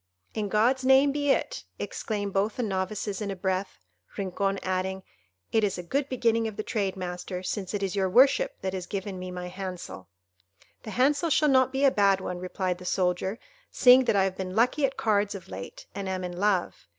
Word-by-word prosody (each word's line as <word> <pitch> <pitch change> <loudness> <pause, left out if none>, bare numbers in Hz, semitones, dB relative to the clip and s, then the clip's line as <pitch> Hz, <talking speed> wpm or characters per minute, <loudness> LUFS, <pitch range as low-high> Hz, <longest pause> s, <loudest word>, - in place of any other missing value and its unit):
"In 210 -2 -2
God's 240 +6 +2
name 265 +2 +5
be 290 0 -1
it!" - - 0
exclaimed 205 -3 -3
both 205 +2 +1
the 250 - 0
novices 195 0 -2
in 205 - -3
a 195 - -3
breath—Rincon 185 - -3
adding, 190 0 -2 0.5
"It 220 - +2
is 200 -3 0
a 180 - -5
good 275 +10 -1
beginning 230 -3 +1
of 215 - -6
the 215 - -2
trade, 200 -3 -1
master, 180 0 -5
since 195 0 -3
it 200 - -2
is 195 0 -2
your 190 -1 +1
worship 280 - +4
that 190 0 -2
is 185 -2 -4
giving 195 -1 -4
me 185 0 -6
my 180 0 -5
hansel." 180 - -7 0.7
"The - - -8
hansel 285 +8 +2
shall 300 0 +3
not 260 -1 +4
be 270 +1 +1
a 275 - +6
bad 200 -3 +3
one," 180 -1 -5
replied 185 0 -2
the - - -10
soldier, 180 +3 0 0.3
"seeing 255 0 +6
that - - +2
I 195 - +4
have 190 -1 -2
been 185 -1 -4
lucky 250 +5 +3
at 270 - -9
cards 205 -2 +1
of 185 - -10
late, 95 +1 -8
and 195 0 -4
am 185 -1 -3
in 180 -1 -5
love. 185 - 0
200 Hz, 205 wpm, -27 LUFS, 185-230 Hz, 0.7 s, a